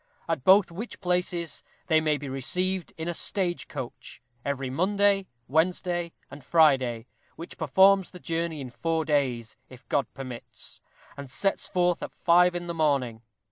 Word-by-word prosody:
At 160 -6 -2
both 190 +2 +6
which 215 +8 -7
places 180 -3 -1 0.2
they 160 -2 +3
may 155 -1 +1
be 145 0 -7
received 180 +8 -1
in 160 +1 -4
a 175 - -1
Stage 175 0 0
Coach, 130 -5 -8 0.2
every 135 -2 -3
Monday, 195 +4 +2 0.2
Wednesday, 175 +3 0 0.2
and 140 -1 -10
Friday, 130 -7 +3 0.3
which 165 - -8
performs 190 +5 +4
the 180 - -11
journey 165 -2 -3
in 130 -2 -7
four 160 +4 -1
days 125 -7 -1
if 130 +1 -15
God 140 -5 0
permits! 130 -3 -9 0.3
and 140 -2 -8
sets 195 +9 -1
forth 180 -1 +1
at - - -6
five 175 +1 +4
in 175 0 -3
the 170 - -4
morning. 140 -8 0
165 Hz, 155 wpm, -27 LUFS, 135-180 Hz, 0.3 s, both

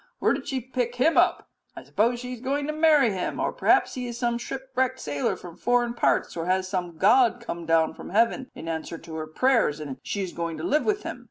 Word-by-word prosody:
Where - - +2
did - - -5
she 265 - -1
pick 245 -1 -3
him 275 +7 +3
up? - - +3 0.3
I - - -9
suppose 235 +3 +1
she 250 +1 -6
is 240 - -9
going 280 +2 -1
to 305 - -2
marry 305 -6 +4
him, 185 -2 -3
or - - 0
perhaps - - +3
he 250 -1 -4
is 240 -1 -6
some 235 -1 0
shipwrecked 260 0 -2
sailor 145 -1 -1
from 175 -2 -11
foreign 245 -1 +1
parts; 235 - +1
or 165 0 -3
has 185 0 +1
some 180 -3 -3
god 240 +5 +4
come 170 -8 -6
down 165 -1 +3
from - - -10
heaven 230 +6 +1
in 165 - -8
answer 165 0 -4
to 165 0 -11
her 155 0 -4
prayers, 225 - +2
and 140 -4 -6
she 200 - -3
is 180 - -6
going 170 -1 -3
to 155 - -6
live 300 - +1
with 415 -1 0
him? - - -5
235 Hz, 240 wpm, -26 LUFS, 170-260 Hz, 0.3 s, marry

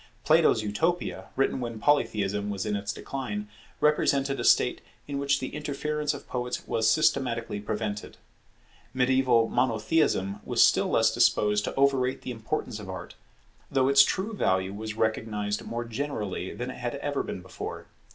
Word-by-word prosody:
Plato's 110 - +4
Utopia, 165 +13 -1
written 135 -1 +1
when 115 -3 -5
Polytheism 105 -7 +1
was 100 0 -3
in 105 -1 -1
its 100 0 -2
decline, 105 -7 -5 0.3
represented 140 -2 +2
a - - -2
state - - +3 0.3
in 140 -1 -3
which 140 0 +1
the 130 - -5
interference 150 0 -2
of 140 - -11
poets 125 -1 -4
was 110 -1 +2
systematically 120 -4 +1
prevented. 105 0 -4 0.8
Mediaeval 125 -3 +3
Monotheism 110 -4 +1
was - - +5
still - - +3
less - - +3
disposed 105 0 +3
to - - -4
overrate 135 -2 +2
the - - -4
importance 110 -1 -4
of 100 -2 -9
Art, 95 -1 -7 0.6
though 135 -1 +2
its 140 0 +8
true 190 +10 +1
value 95 - 0
was 110 +1 -5
recognized 110 -2 -1
more 120 0 -4
generally 110 -7 -4
than 125 +1 -5
it - - -10
had 120 +1 -3
ever 145 0 -2
been 90 - -6
before. 95 - -7
120 Hz, 155 wpm, -27 LUFS, 105-140 Hz, 0.8 s, its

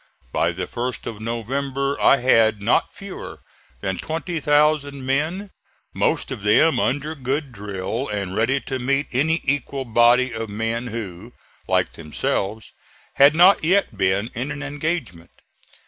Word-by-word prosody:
By - - +1
the - - -4
1st 125 +1 -4
of 110 -2 -6
November 135 +5 -2
I 140 - +6
had 115 -4 +4
not 100 +4 +1
fewer 200 -1 -9 0.4
than 95 -3 -2
20,000 150 -4 0
men, 160 +9 -1 0.4
most - - 0
of - - -5
them 110 +11 +4
under 145 +7 0
good 140 0 -3
drill 105 +4 -4
and 100 -3 -3
ready 120 +6 +2
to 130 -1 -4
meet 135 +3 0
any 160 +6 +1
equal 140 -1 -1
body 120 +2 +4
of 115 -1 -4
men 115 +3 -2
who, 110 -1 -7 0.3
like - - +1
themselves, 95 +7 -3 0.5
had 140 +2 +7
not 180 +2 +6
yet 180 - +2
been 100 +4 0
in 125 +5 -3
an 145 0 -5
engagement. 145 - -4
130 Hz, 140 wpm, -22 LUFS, 110-145 Hz, 0.5 s, had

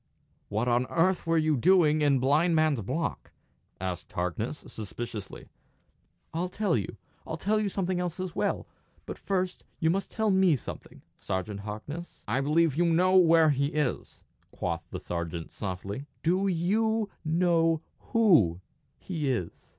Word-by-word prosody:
"What 110 +4 -1
on 120 +1 +2
earth 175 +1 +1
were 165 0 +3
you 155 -1 +3
doing 155 +1 +4
in 145 -2 +4
Blind 150 +7 +3
Man's 155 -6 +2
Block?" 95 - -3 0.5
asked 90 -2 -4
Harkness, 90 - -3
suspiciously. 110 0 -7 0.9
"I'll 175 +3 -1
tell 200 -1 0
you. 100 -5 -3 0.3
I'll 160 - -4
tell 215 +5 +1
you 210 -1 0
something 185 -2 -1
else 180 -1 -3
as 185 -2 -4
well! - - -1 0.4
But - - -7
first 185 -2 -2
you 160 -2 +2
must 195 +2 -1
tell 220 -2 0
me 190 -4 +4
something, 125 - -9 0.2
Sergeant 95 +2 -3
Harkness." 110 +12 -7
"I 135 - +1
believe 155 +1 +2
you 175 +3 +2
know 180 +3 +3
where 165 -3 +6
he 140 0 +1
is," 150 -3 -2 0.3
quoth - - -4
the - - -5
sergeant, 85 -1 -4
softly. 100 +7 -5 0.2
"Do 185 +4 +2
you 210 +5 +1
know 165 -1 +2 0.3
who 160 - +4 0.4
he 155 -7 -3
is?" 95 -10 -3
160 Hz, 150 wpm, -28 LUFS, 120-180 Hz, 0.9 s, where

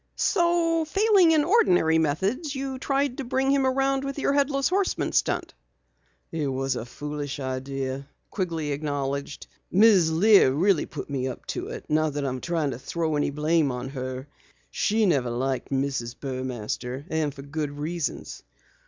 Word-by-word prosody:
"So 340 -3 +2
failing 390 +2 +4
in 315 -2 +4
ordinary 180 - +4
methods, 200 - -1
you 265 -1 -4
tried 275 -1 0
to - - -2
bring 265 +2 +1
him 275 -1 +3
around 270 +1 +1
with 275 0 -4
your 280 - +1
Headless 275 -1 +2
Horseman 385 +1 0
stunt?" - - 0 0.8
"It 155 -3 -2
was 135 0 -1
a 115 - -5
foolish 145 +2 -5
idea," 135 +1 -4 0.2
Quigley 165 -6 -2
acknowledged. 140 -1 -3 0.3
"Mrs. 195 -5 +5
Lear 200 -7 +6
really 175 +3 +2
put 145 - -7
me 135 -2 -2
up 130 - -7
to - - -4
it - - -7
not 155 -1 +1
that 145 -1 -2
I'm 130 -1 -3
trying 165 -4 -1
to 120 - -6
throw 160 +3 -2
any 145 - +1
blame 150 0 +1
on 125 +1 -5
her. 130 0 -5 0.4
She 215 +1 +1
never 135 -10 +2
liked 130 +2 -2
Mrs. 135 -3 -2
Burmaster, 130 0 -4
and 160 -2 0
for 135 0 -10
good 145 +1 -3
reasons. 160 +1 -4
155 Hz, 160 wpm, -26 LUFS, -, 0.8 s, Lear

